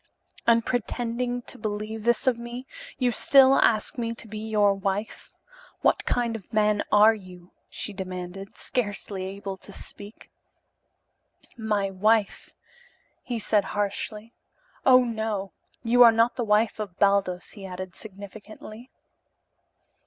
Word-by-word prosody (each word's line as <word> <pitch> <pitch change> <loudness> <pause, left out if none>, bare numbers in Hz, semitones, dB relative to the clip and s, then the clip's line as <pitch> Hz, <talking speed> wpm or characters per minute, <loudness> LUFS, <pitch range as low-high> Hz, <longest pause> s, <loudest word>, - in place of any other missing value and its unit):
"And 230 -1 +4
pretending 245 0 -2
to - - -11
believe 215 +1 -4
this 240 +3 +2
of 260 -2 +3
me, 240 +2 -7 0.3
you 250 -2 +1
still 270 +2 +6
ask 220 +2 +2
me 230 -1 -2
to 230 - -10
be 215 0 -7
your 210 -2 +2
wife. 195 +2 -4 0.5
What - - +2
kind 240 -2 0
of 205 -5 -8
a - - -7
man 210 -1 +3
are 210 +2 +7
you?" 185 -4 -12 0.2
she 210 - -5
demanded, 185 +1 -7
scarcely 205 -4 -3
able 195 0 -6
to 200 - -15
speak. 205 +2 -11 1.2
"My 210 -4 -1
wife?" 210 +2 +1 0.7
he 240 - -4
said 210 -1 +1
harshly. 210 +2 -3 0.5
"Oh, 255 -1 +7
no. 220 -4 -3 0.3
You 245 +1 +3
are 235 -1 +10
not 230 +1 +2
the 240 - -2
wife 215 +1 +2
of 200 -4 -6
Baldos," 195 -3 +1
he 205 - -11
added 185 0 -7
significantly. 215 +3 -11
215 Hz, 135 wpm, -26 LUFS, 200-230 Hz, 1.2 s, are